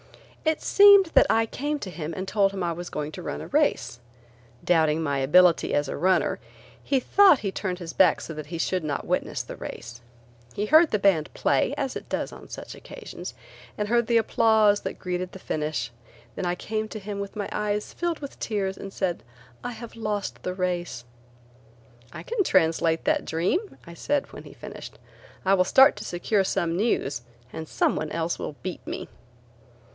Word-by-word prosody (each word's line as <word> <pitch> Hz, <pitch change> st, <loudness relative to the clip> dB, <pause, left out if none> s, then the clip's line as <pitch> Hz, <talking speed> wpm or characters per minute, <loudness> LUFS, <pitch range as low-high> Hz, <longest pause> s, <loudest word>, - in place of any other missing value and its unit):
It 315 Hz, -1 st, 0 dB
seemed 400 Hz, -3 st, +7 dB
that -, -, +6 dB
I 225 Hz, 0 st, +3 dB
came 290 Hz, +6 st, -3 dB
to 195 Hz, -9 st, -7 dB
him 160 Hz, -2 st, -5 dB
and 190 Hz, +1 st, -4 dB
told 200 Hz, -1 st, +2 dB
him 195 Hz, -2 st, -4 dB
I 170 Hz, -, 0 dB
was 175 Hz, +1 st, -6 dB
going 150 Hz, 0 st, -4 dB
to 180 Hz, -, -8 dB
run -, -, -4 dB
a -, -, -7 dB
race. 290 Hz, -, +1 dB, 0.6 s
Doubting 160 Hz, -2 st, +2 dB
my 140 Hz, -2 st, 0 dB
ability 170 Hz, +5 st, +4 dB
as 145 Hz, 0 st, +1 dB
a -, -, -4 dB
runner, 185 Hz, +4 st, +1 dB, 0.4 s
he 275 Hz, -, +2 dB
thought 380 Hz, +2 st, +5 dB
he 195 Hz, -, -3 dB
turned 185 Hz, -2 st, -3 dB
his 170 Hz, -2 st, -7 dB
back 180 Hz, -4 st, +4 dB
so 165 Hz, -, -7 dB
that 155 Hz, -1 st, -7 dB
he 170 Hz, +2 st, -5 dB
should 180 Hz, +1 st, -1 dB
not 145 Hz, -2 st, -3 dB
witness -, -, -1 dB
the -, -, -8 dB
race. 120 Hz, +1 st, -8 dB, 0.5 s
He 205 Hz, -, -1 dB
heard 315 Hz, +6 st, +6 dB
the 210 Hz, -, +1 dB
band 195 Hz, -6 st, +2 dB
play, 140 Hz, -, +1 dB
as 270 Hz, -2 st, -2 dB
it -, -, -7 dB
does -, -, -2 dB
on -, -, -12 dB
such -, -, -8 dB
occasions, -, -, -9 dB, 0.4 s
and 210 Hz, -, -1 dB
heard 235 Hz, 0 st, +2 dB
the 235 Hz, -, +4 dB
applause 220 Hz, -2 st, +4 dB
that -, -, -5 dB
greeted 180 Hz, 0 st, -4 dB
the -, -, -8 dB
finish. 150 Hz, -, -3 dB, 0.4 s
Then 180 Hz, -, -2 dB
I 175 Hz, -, 0 dB
came 215 Hz, +3 st, -3 dB
to 215 Hz, -, -7 dB
him 200 Hz, 0 st, -6 dB
with 200 Hz, 0 st, -6 dB
my 205 Hz, -2 st, -3 dB
eyes 210 Hz, 0 st, -2 dB
filled 345 Hz, -2 st, -2 dB
with 280 Hz, -2 st, -9 dB
tears 195 Hz, -3 st, -2 dB
and 195 Hz, -, -8 dB
said: 185 Hz, -3 st, -2 dB, 0.4 s
"I 245 Hz, -, -4 dB
have 230 Hz, +1 st, -10 dB
lost 210 Hz, -3 st, -3 dB
the 180 Hz, -, -4 dB
race." 175 Hz, -9 st, -2 dB, 1.1 s
"I -, -, -8 dB
can 455 Hz, -3 st, 0 dB
translate 165 Hz, -, +2 dB
that 305 Hz, 0 st, +1 dB
dream," 190 Hz, -, -1 dB
I 170 Hz, -, -10 dB
said, 285 Hz, -, -2 dB
when -, -, -10 dB
he -, -, -12 dB
finished; -, -, -10 dB, 0.5 s
"I 190 Hz, -, +4 dB
will 185 Hz, -2 st, +5 dB
start 265 Hz, +9 st, +6 dB
to -, -, -6 dB
secure 190 Hz, +3 st, 0 dB
some 170 Hz, -3 st, -1 dB
news 160 Hz, -, 0 dB, 0.3 s
and 160 Hz, -, -6 dB
some -, -, +1 dB
one 155 Hz, -, -3 dB
else 165 Hz, +1 st, -2 dB
will 150 Hz, -, -5 dB
beat 185 Hz, -2 st, -6 dB
me." -, -, -5 dB
190 Hz, 195 wpm, -26 LUFS, 165-225 Hz, 1.1 s, seemed